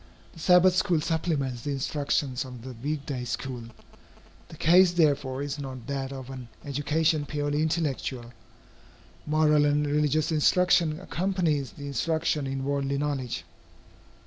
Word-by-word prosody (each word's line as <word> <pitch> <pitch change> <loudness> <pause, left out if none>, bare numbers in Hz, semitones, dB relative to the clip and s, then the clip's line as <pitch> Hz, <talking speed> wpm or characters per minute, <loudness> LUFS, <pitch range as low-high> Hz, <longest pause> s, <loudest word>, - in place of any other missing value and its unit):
The - - -13
Sabbath 180 +2 +5
school 180 -3 +2
supplements 150 -6 -1
the 145 - -4
instructions 140 -2 -1
of 125 -3 -10
the 130 0 -7
week 140 +4 -4
day 130 -4 -3
school. 125 0 -4 0.8
The 160 - -12
case, 175 +2 +5
therefore, 140 -5 +1
is 145 +1 -4
not 130 -4 -7
that 135 -1 -3
of 135 -1 -7
an 130 -2 -8 0.2
education 150 +2 0
purely 145 +1 -1
intellectual. 140 -6 -2 0.9
Moral 150 -1 +4
and 145 0 +2
religious 150 +2 +1
instruction 165 0 +3
accompanies 175 -7 -1
the 145 - -9
instruction 155 0 0
in 135 0 -3
worldly 140 0 -1
knowledge. 140 -4 -2
145 Hz, 135 wpm, -27 LUFS, 135-160 Hz, 0.9 s, Sabbath